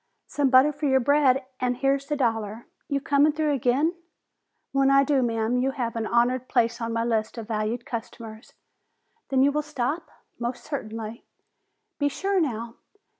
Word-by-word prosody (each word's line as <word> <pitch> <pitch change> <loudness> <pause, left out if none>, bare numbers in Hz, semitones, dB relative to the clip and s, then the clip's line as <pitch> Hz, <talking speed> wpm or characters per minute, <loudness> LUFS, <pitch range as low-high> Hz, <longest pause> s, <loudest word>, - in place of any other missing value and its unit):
"Some 285 -2 0
butter 260 +3 +6
for 290 +1 -2
your 265 -1 +4
bread, 270 0 +3
an' 250 -1 0
here's 275 +2 0
the 295 - -1
dollar. 225 -4 -1 0.2
You 280 - +1
comin' 285 +2 +3
through 305 -1 0
again?" 275 +5 +1 0.8
"When 275 0 +3
I 275 0 +6
do, 275 -1 +2
ma'am, 230 0 0
you 255 +2 +1
have 235 -3 -2
an 225 -1 -2
honored 245 +2 +1
place 235 -1 +1
on 230 0 -2
my 230 0 0
list 225 -1 -1
of 225 -2 -6
valued 220 +2 -2
customers." 225 -1 -8 0.8
"Then 265 -1 +3
you 285 - +4
will 300 +1 0
stop?" 300 +2 -3 0.3
"Most 240 +1 -4
certainly." 225 -5 -6 0.8
"Be 285 -1 +2
sure 390 +5 0
now." 235 -5 -3
255 Hz, 170 wpm, -25 LUFS, 230-280 Hz, 0.8 s, butter